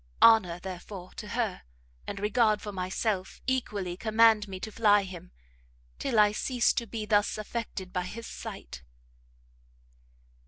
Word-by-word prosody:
Honour, 195 -7 +6
therefore, 185 0 -8
to 210 - -6
her, 220 -3 -2 0.5
and 195 - -4
regard 210 +1 +3
for 210 - -6
myself, 190 +1 -2
equally 210 -8 -1
command 220 +1 +4
me 190 -1 -6
to 220 - -5
fly 205 -2 +4
him, 180 -1 -9 0.7
till 230 - -1
I 210 -1 +6
cease 245 +3 +1
to 235 - -2
be 215 0 -4
thus 205 0 +2
affected 215 -4 -5
by 180 -1 -1
his 230 +5 -7
sight." 195 - -8
210 Hz, 140 wpm, -29 LUFS, 185-225 Hz, 0.7 s, Honour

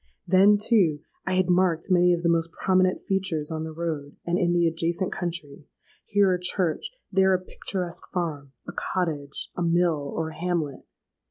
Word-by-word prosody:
Then, 195 +3 +6
too, 195 -9 +2 0.3
I 190 - +1
had 185 -1 +2
marked 180 -1 +2
many 180 0 +5
of 175 -1 0
the - - +2
most 165 0 +1
prominent 185 -1 +2
features 180 -6 -1
on 160 0 -3
the 160 - -6
road 155 -3 -4
and 175 +1 0
in 175 -1 +2
the 175 -1 +3
adjacent 170 +3 -1
country,—here 175 +4 -2
a 180 - -1
church—there 190 - 0
a - - 0
picturesque 185 -1 -5
farm—a 145 -8 -5
cottage—a 160 -3 -3
mill—or 165 -3 0
a 155 - -11
hamlet! 165 -4 -2
175 Hz, 150 wpm, -26 LUFS, 160-185 Hz, 0.3 s, Then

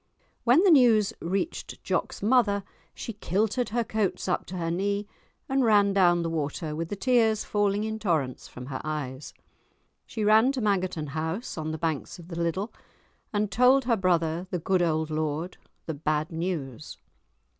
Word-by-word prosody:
When 255 +9 +5
the 390 - +6
news 235 -8 +5
reached 195 - -3
Jock's - - -2
mother 210 -3 +3 0.3
she 230 - -6
kilted 215 +5 -1
her 235 +2 0
coats 215 -5 -1
up 180 - -1
to 185 - -6
her 165 -1 -2
knee, 200 +3 -1 0.4
and 270 0 +1
ran 205 -3 +4
down 175 -3 +4
the 165 - -1
water 155 0 -3
with 165 +1 -4
the - - -3
tears 225 -1 +2
falling 205 0 0
in 220 0 -3
torrents 155 - -1
from 125 - -9
her 130 0 -5
eyes. 150 -3 -4 0.8
She 220 - -4
ran 220 +5 +5
to 265 - -3
Mangerton 185 -7 0
House, 160 - -3
on 155 -1 -4
the 160 - -3
banks 160 -3 -3
of 170 -1 -13
the 170 - -6
Liddel, 170 +6 -2 0.6
and 210 -1 -1
told 250 +4 +4
her 240 -2 +3
brother, 175 -2 0
the 180 - -1
good 180 +2 +1
old 160 -2 0
lord, 155 +3 -2 0.3
the 160 - -3
bad 155 +2 -1
news. 160 -5 -4
185 Hz, 170 wpm, -27 LUFS, 160-215 Hz, 0.8 s, the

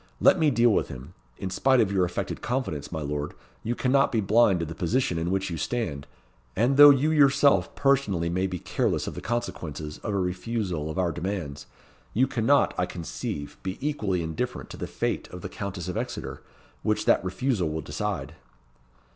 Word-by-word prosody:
"Let 185 - +5
me 155 -2 +4
deal 120 -2 +4
with - - +1
him. 65 +7 -9 0.2
In 95 - -4
spite 130 +7 +3
of 100 -4 +3
your 95 -2 +2
affected 90 - -4
confidence, 120 - -3
my 80 -2 -3
lord, 75 0 -3 0.3
you 120 +2 -2
cannot 135 +2 +2
be 115 - +1
blind 105 -2 +4
to 85 - -1
the 80 - -6
position 90 +1 0
in 85 +1 -1
which 95 0 -1
you 85 - -3
stand. 75 - -3 0.5
And 120 +6 +2
though 145 +1 +11
you 145 +2 +4
yourself 140 -2 +4
personally 130 -12 +2
may 90 +3 0
be 90 -1 -4
careless - - -1
of - - -4
the - - -7
consequences 80 -10 -4
of 105 -3 -3
a - - +1
refusal 90 -3 -2
of 80 - -5
our 90 -2 +1
demands, 85 -5 -4 0.5
you 125 +4 +4
cannot, 135 +3 +2
I 90 - +1
conceive, 80 -4 -5
be 95 0 -4
equally 105 - -1
indifferent 80 -1 -4
to - - -8
the - - -4
fate - - -2
of 90 - -9
the - - -5
Countess 95 -3 -5
of 90 - -3
Exeter, 120 +1 -5 0.4
which - - 0
that - - +4
refusal 95 - 0
will 80 +1 -3
decide." - - -4
95 Hz, 190 wpm, -26 LUFS, 85-120 Hz, 0.5 s, though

